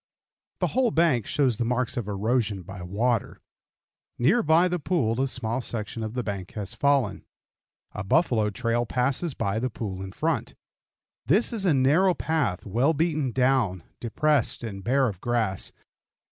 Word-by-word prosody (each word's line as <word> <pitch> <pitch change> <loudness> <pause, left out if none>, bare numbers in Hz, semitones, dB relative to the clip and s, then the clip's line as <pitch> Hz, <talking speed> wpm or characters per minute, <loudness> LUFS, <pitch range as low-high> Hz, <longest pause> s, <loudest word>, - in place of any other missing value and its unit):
The - - +2
whole 255 -2 +3
bank 160 - +2
shows 135 -6 +1
the 120 - 0
marks 125 +1 -1
of 120 -4 -3
erosion 105 -1 0
by 95 +1 -9
water. 110 +6 -1 0.8
Near 170 - +3
by 165 +2 +4
the 180 0 -1
pool 130 -8 0
a 135 - +1
small 125 -1 -2
section 115 -1 -4
of 110 +1 -5
the 125 - -1
bank 100 -4 -5
has 105 0 -5
fallen. 130 -5 +1 0.7
A 105 - -5
buffalo 110 - +2
trail 115 +3 -1
passes 135 +5 0
by 100 +2 -1
the 130 +2 -1
pool 100 -4 -5
in 95 0 -6
front. - - -2 0.7
This 210 - +3
is 210 -4 +1
a 175 - +4
narrow 155 +8 +4
path, 155 - -1
well 120 +10 +1
beaten 155 -4 0
down, 125 -9 +1 0.2
depressed, 140 +1 +1
and 100 -4 -6
bare 135 +4 +2
of 95 -5 -5
grass. 115 -6 0
120 Hz, 160 wpm, -26 LUFS, 105-145 Hz, 0.8 s, by